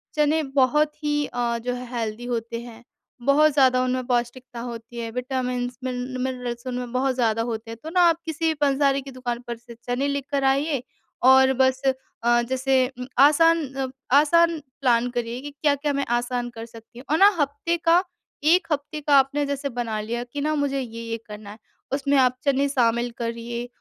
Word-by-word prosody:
चने 305 +1 +2
बहुत 275 +2 +2
ही 295 0 +1
अ, 240 -2 -2
जो 245 +2 -3
है 250 0 -6
हेल्दी 225 +1 -3
होते 230 -1 -3
हैं। 235 -1 -12 0.5
बहुत 305 +2 +5
ज़्यादा 260 -2 +4
उनमें 255 0 -1
पौष्टिकता 245 0 -2
होती 235 0 -7
है। 230 -1 -4
विटामिन्स, 250 0 -3
मिन 250 -1 -3 0.2
मिनरल्स 250 -1 -4
उनमें 250 -1 -4
बहुत 260 +1 0
ज़्यादा 225 -3 +1
होते 225 0 -5
हैं 230 - -7
तो 315 - -5
ना, 360 +2 +2
आप 335 -1 +4
किसी 325 0 -3
भी 320 - +2
पंसारी 275 -1 +2
की 275 0 -10
दुकान 245 -2 -4
पर 235 -1 -4
से 235 0 -13
चने 245 +3 -1
लेकर 280 0 -2
आइए 280 -1 -1 0.5
और 265 0 +6
बस 260 0 +2 0.4
अ, 240 0 +4
जैसे 260 +1 +1 0.2
उम, 250 - -4
आसान 325 +3 +5
अ, 270 -1 -2 0.3
आसान 335 +3 +4 0.2
प्लान 245 -2 +3
करिए 240 0 -3
कि 290 - -7
क्या-क्या 285 0 0
मैं 280 0 -1
आसान 245 0 -2
कर 225 0 -6
सकती 230 +1 -14
हूँ 260 - -12
और 315 - +4
ना 390 - +8
हफ़्ते 290 +4 0
का 340 +2 +5 0.5
1 360 +2 +3
हफ़्ते 300 +1 -2
का 290 -1 +3
आपने 280 +2 0
जैसे 280 0 -3
बना 235 -3 -3
लिया 235 +3 -3
कि 245 +4 -6
ना 305 +2 0
मुझे 285 -2 0
ये-ये 230 -2 -5
करना 210 -1 -9
है। 210 - -11 0.4
उसमें 280 0 +1
आप 255 -1 +4
चने 280 0 +2
शामिल 240 -2 +1
करिए। 235 0 -4
255 Hz, 190 wpm, -24 LUFS, 240-285 Hz, 0.5 s, ना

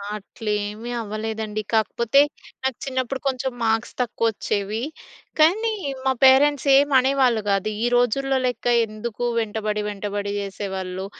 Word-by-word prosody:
అట్లేమీ 210 +1 -4
అవ్వలేదండి. 215 0 -4
కాకపోతే 235 +4 +3 0.4
నాకు 265 -1 0
చిన్నప్పుడు 260 0 -2
కొంచెం 265 0 -1
మార్క్స్ 225 0 0
తక్కువొచ్చేవి. 220 -2 -1 0.6
కానీ 420 +9 +4 0.3
మా 265 - +4
పేరెంట్స్ 280 +2 +5
ఏం 285 +1 +5
అనేవాళ్ళు 255 -3 +2
గాదు. 195 +1 +1
ఈ - - +2
రోజుల్లో 265 +3 +2
లెక్క 250 -1 -3 0.2
ఎందుకు 215 +2 -6 0.2
వెంటబడి 215 -1 -2
వెంటబడి 205 0 -4
చేసేవాళ్ళు, 190 -2 -5
225 Hz, 115 wpm, -23 LUFS, 210-260 Hz, 0.6 s, పేరెంట్స్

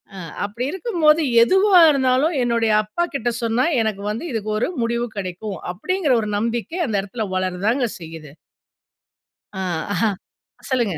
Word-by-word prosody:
ஆ - - -9 0.3
அப்படி 220 +5 -4
இருக்கும்போது, 335 -6 +2 0.2
எதுவா 380 - +5
இருந்தாலும் 270 +3 +2
என்னுடைய 230 -2 +1
அப்பாகிட்ட 275 +1 -2
சொன்னா, 230 +3 +1 0.2
எனக்கு 215 -3 -2
வந்து 220 +8 -5
இதுக்கு 215 -1 -3
ஒரு 240 - 0
முடிவு 235 +1 -1
கெடைக்கும். 190 +1 -5 0.2
அப்பிடீங்கிற 320 - 0
ஒரு 210 - -3
நம்பிக்கை 235 - -2
அந்த 220 - -2
எடத்துல 210 +3 -5
வளரதாங்க 190 +7 0
செய்யுது. 160 -3 -10 1.2
அ, - - -3 0.3
அஹ. 180 - -1 0.7
சொல்லுங்க.. 235 - 0
230 Hz, 130 wpm, -21 LUFS, 205-280 Hz, 1.2 s, எதுவா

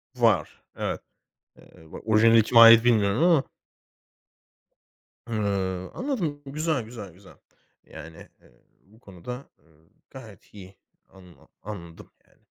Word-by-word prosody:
Var, - - 0
evet. - - -4 0.6
Eee, 80 -1 -19
va - - -8
orijinali 115 +1 +4
kime 115 +2 +4
ait 115 0 +8
bilmiyorum 110 +2 +2
ama. 165 -6 +3 1.8
Hıı, 100 -4 -3
anladım. 185 - -4
Güzel 150 -2 -2
güzel 110 -5 -10
güzel. 95 +2 -18 0.5
Yani, 80 +1 -12 0.2
eee, - - -24 0.3
bu 110 +4 -24
konuda 125 +7 -10 0.6
gayet 115 -8 -15
iyi 95 -2 -14 0.3
anla 90 -3 -19
anladım 85 -5 -11 0.2
yani. - - -32
110 Hz, 110 wpm, -25 LUFS, 95-125 Hz, 1.8 s, ait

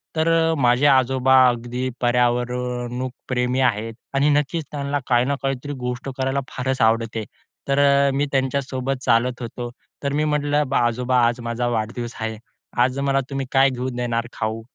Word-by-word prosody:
तर 160 0 +1 0.2
अ, - - +1
माझे 125 +2 +3
आजोबा 130 -1 +4
अगदी 120 +1 -2
पर्यावरण 125 +1 0 0.2
प्रेमी 125 0 0
आहेत. 115 -3 +1 0.2
आणि 140 +2 +3
नक्कीच 150 +3 +1
त्यांना 145 0 -2
काही 120 -1 +3
ना 140 +2 0
काहीतरी 135 +1 -2
गोष्ट 125 +2 -3
करायला 135 +1 0
फारच 130 +1 -2
आवडते. 115 0 +1 0.4
तर 140 0 +2
अ, 140 0 +4
मी 140 +2 +1
त्यांच्यासोबत 135 0 -1
चालत 125 +1 +2
होतो. 120 +1 -5 0.3
तर 140 0 -1
मी 150 +1 +1
म्हटलं, 150 -1 +1
"बा - - +1
आजोबा 125 +2 0
आज 120 +1 -1
माझा 120 +1 -2
वाढदिवस 120 +1 -3
आहे. 110 -1 -3 0.5
आज 130 +2 0
मला 140 0 +1
तुम्ही 135 -1 -3
काय 135 0 +5
घेऊन 130 0 -4
देणार 120 -1 -1
खाऊ?" 110 +1 -3
125 Hz, 165 wpm, -22 LUFS, 120-135 Hz, 0.5 s, काय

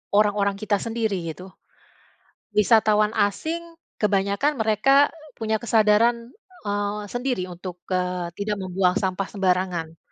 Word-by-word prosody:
orang-orang 205 -1 +3
kita 210 -1 +1
sendiri, 225 -3 -1 0.2
gitu. 185 +3 -12 1.0
Wisatawan 215 0 +4
asing 230 +11 0 0.4
kebanyakan 200 +7 +1
mereka 270 +7 +4 0.3
punya 220 -1 0
kesadaran 225 0 +4 0.5
eee, 205 +1 -1
sendiri 245 -7 -2
untuk 180 0 -8
eee, 180 -1 -1
tidak 205 0 -1
membuang 185 0 +1
sampah 190 0 -1
sembarangan. 180 -4 -1
205 Hz, 105 wpm, -24 LUFS, 185-220 Hz, 1.0 s, Wisatawan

